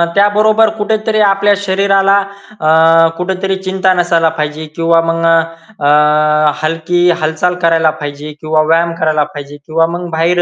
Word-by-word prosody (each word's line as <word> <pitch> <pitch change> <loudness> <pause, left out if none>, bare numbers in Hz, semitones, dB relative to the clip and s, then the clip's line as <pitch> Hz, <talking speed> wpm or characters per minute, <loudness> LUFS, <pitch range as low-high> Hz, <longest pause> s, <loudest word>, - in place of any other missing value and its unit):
त्याबरोबर 215 +2 +3
कुठेतरी 215 +1 -1
आपल्या 200 +1 +2
शरीराला 195 +1 +2 0.4
अ, 155 - -1 0.5
कुठेतरी 190 +1 -3
चिंता 190 0 0
नसायला 170 -2 +1
पाहिजे. 150 +1 -4
किंवा 165 0 +2
मग 165 0 -2 0.6
अ, 150 +1 +2
हलकी 165 +3 0
हालचाल 160 +3 -1
करायला 165 -1 +2
पाहिजे 145 +1 -7
किंवा 155 0 0
व्यायाम 165 +1 +1
करायला 155 -1 +1
पाहिजे 145 0 -9
किंवा 165 +1 0
मग 175 -1 -7
बाहेर 170 +2 0
165 Hz, 135 wpm, -13 LUFS, 155-190 Hz, 0.6 s, त्याबरोबर